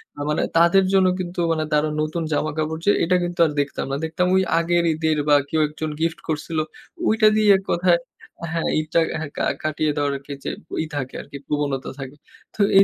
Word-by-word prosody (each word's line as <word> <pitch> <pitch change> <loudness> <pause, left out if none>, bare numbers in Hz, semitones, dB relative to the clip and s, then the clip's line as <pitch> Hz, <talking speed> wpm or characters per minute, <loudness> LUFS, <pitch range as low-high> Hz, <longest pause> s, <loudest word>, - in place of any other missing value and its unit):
না 145 - -7
মানে 150 - +1 0.2
তাদের 170 +3 +5
জন্য 190 -1 +5
কিন্তু 175 -1 -4
মানে 160 -1 0
তারা 150 +1 +2
নতুন 155 +2 -2
জামাকাপড় 155 +1 -1
যে, 205 - +6
এটা 180 +2 +2
কিন্তু 175 0 -4
আর 155 - 0
দেখতাম 140 0 -2
না। 135 - 0
দেখতাম 165 +3 0
ঐ - - +5 0.2
আগের 170 +1 +1
ঈদের 155 0 0
বা 145 - +6
কেউ 160 - 0
১ 150 - -14
জন 155 - -1
গিফট 165 0 -1
করছিল 160 +1 -3 0.5
ঐটা 220 0 +4
দিয়ে 215 -1 +3
এক - - -13
কথায় 175 0 +3 0.6
হ্যাঁ, 165 - 0
ঈদটা 155 +2 +1 0.2
হ্যা 155 - -3
কা - - 0 0.2
কাটিয়ে 155 0 0
দেওয়ার 145 -1 0
আর - - -14
কি 145 - -6
যে - - -2 0.3
ই - - -4
থাকে 135 -2 -4
আর - - -15
কি 140 - -6
প্রবণতা 145 -3 -2
থাকে। 135 +1 -7 0.4
তো - - -19 0.2
এই 195 - +9
160 Hz, 215 wpm, -22 LUFS, 150-175 Hz, 0.6 s, এই